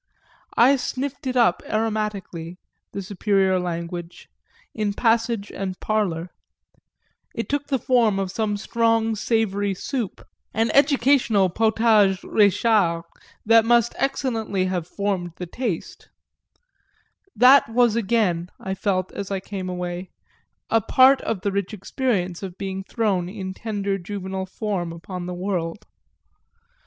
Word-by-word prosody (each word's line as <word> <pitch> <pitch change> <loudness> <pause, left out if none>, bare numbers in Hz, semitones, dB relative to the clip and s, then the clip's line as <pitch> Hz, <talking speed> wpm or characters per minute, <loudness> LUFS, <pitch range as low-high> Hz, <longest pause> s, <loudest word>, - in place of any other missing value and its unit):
I 265 +4 +6
sniffed 270 +1 -4
it 255 - -2
up 230 -8 +3
aromatically, 210 -6 -2 0.4
the 200 - -5
superior 190 -1 +1
language, 170 0 -5 0.4
in 210 -2 -2
passage 225 -2 +1
and 190 -1 -5
parlour 185 -6 -1 1.0
it - - -3
took 285 0 -2
the 275 - +1
form 235 -5 +2
of 195 -1 -2
some 210 0 -1
strong 225 +1 +1
savoury 205 -3 0
soup, 230 +1 -4 0.3
an 225 +1 +2
educational 260 - +3
potage 220 -2 +3
Réchard 200 -4 +2 0.4
that 225 +1 +6
must 235 0 +3
excellently 225 -8 -1
have 180 -3 -2
formed 190 -4 -2
the 180 - -6
taste: 200 -1 -5 1.3
that 260 0 +6
was 235 -1 +3
again, 195 -6 +1
I 190 - -4
felt 185 -1 -1
as 200 - -6
I 195 -1 -1
came 185 -1 -6
away, 180 0 -4 0.6
a 225 - +4
part 260 +5 +5
of 215 -5 -3
the 200 - -1
rich 200 +1 -2
experience 195 -4 -2
of 190 -2 -7
being 195 -1 -4
thrown 195 -5 -1
in 190 -1 -6
tender 200 -2 -3
juvenile 190 0 -5
form 190 -4 -3
upon 175 +2 -7
the 180 - -4
world. 180 +1 -3
200 Hz, 125 wpm, -23 LUFS, 185-225 Hz, 1.3 s, I